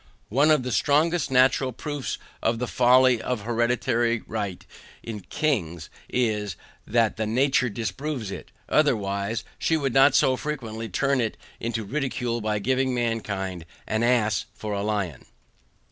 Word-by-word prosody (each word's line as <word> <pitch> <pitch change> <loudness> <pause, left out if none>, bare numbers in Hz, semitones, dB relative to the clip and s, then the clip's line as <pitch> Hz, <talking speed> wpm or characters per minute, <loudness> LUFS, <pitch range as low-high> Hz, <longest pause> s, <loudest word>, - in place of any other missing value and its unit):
One 140 +7 +3
of 150 -4 +4
the 125 - -3
strongest 155 +7 +2
NATURAL 130 0 +3
proofs 145 - -4 0.2
of 115 - +1
the 125 - -2
folly 125 0 +4
of 125 -4 -2
hereditary 120 +1 +1
right 100 -5 -4 0.4
in 110 -2 -5
kings, 90 - -2 0.2
is, 105 -5 0 0.3
that 115 -1 +1
nature 125 +4 +2
disapproves 115 +3 -4
it, - - -8 0.2
otherwise, 105 -6 +1 0.2
she 160 - +2
would 135 -5 -1
not 135 +2 +6
so 130 - +4
frequently 115 -7 -5
turn 140 +6 +1
it 110 -2 -2 0.2
into 115 -1 -2
ridicule 125 -1 -2
by 105 0 0
giving 130 +4 +1
mankind 100 -7 -2 0.2
an 110 +1 -1
ASS 115 -3 +2
FOR 105 -1 -4
A 100 - -1
LION. 100 -9 -2
120 Hz, 140 wpm, -25 LUFS, 105-130 Hz, 0.4 s, not